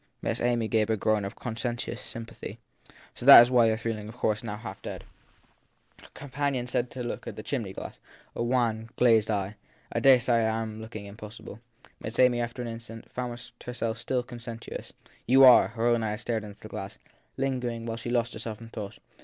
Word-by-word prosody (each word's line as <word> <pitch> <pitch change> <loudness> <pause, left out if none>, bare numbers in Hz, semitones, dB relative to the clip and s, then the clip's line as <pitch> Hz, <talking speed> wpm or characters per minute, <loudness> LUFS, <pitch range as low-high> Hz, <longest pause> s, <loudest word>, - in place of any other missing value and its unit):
Miss - - -1
Amy 120 -2 +1
gave 110 -1 +1
a 110 - +2
groan 110 0 +1
of 100 - -6
conscientious 120 0 -4
sympathy. 115 -1 -7 0.6
So - - -9
that 120 - +12
you 125 -1 +4
re 110 -1 +3
feeling 110 -2 -4
now, - - -8
of 115 - -11
course, 105 -3 0
half 105 -2 -7
dead. - - -6 1.0
Her - - -15
companion 140 -2 -2
turned 125 0 -1
to 125 - -6
the 120 - -5
chimney - - -3
glass - - -8 0.4
a - - -3
wan, 115 -2 0
glazed 115 -3 +4
eye. 105 0 -1 0.3
I - - 0
dare 135 -2 +7
say 120 -2 +2
I 110 0 0
am 110 0 -7
looking 110 -2 -8
impossible. 105 +1 -10 0.4
Miss 110 +1 -5
Amy, 125 -2 +4
after 120 +1 -4
an - - -4
instant, 115 0 -8
found 125 -1 -4 0.2
herself 120 -2 -3
still 125 +2 -1
conscientious. 120 -2 -8 0.4
You 135 +3 +7
are. 125 -2 +9
Her 115 +1 -3
own 120 -1 +3
eyes 105 0 -2
strayed 115 -2 -1
to 105 -1 -9
the - - -10
glass, - - -7 0.4
lingering 125 -3 -1
there 115 - -5
while 115 - -3
she 115 +1 -5
lost 120 -1 0
herself 110 -1 -6
in 115 0 -11
thought. 105 -2 -7
115 Hz, 195 wpm, -28 LUFS, 110-120 Hz, 1.0 s, that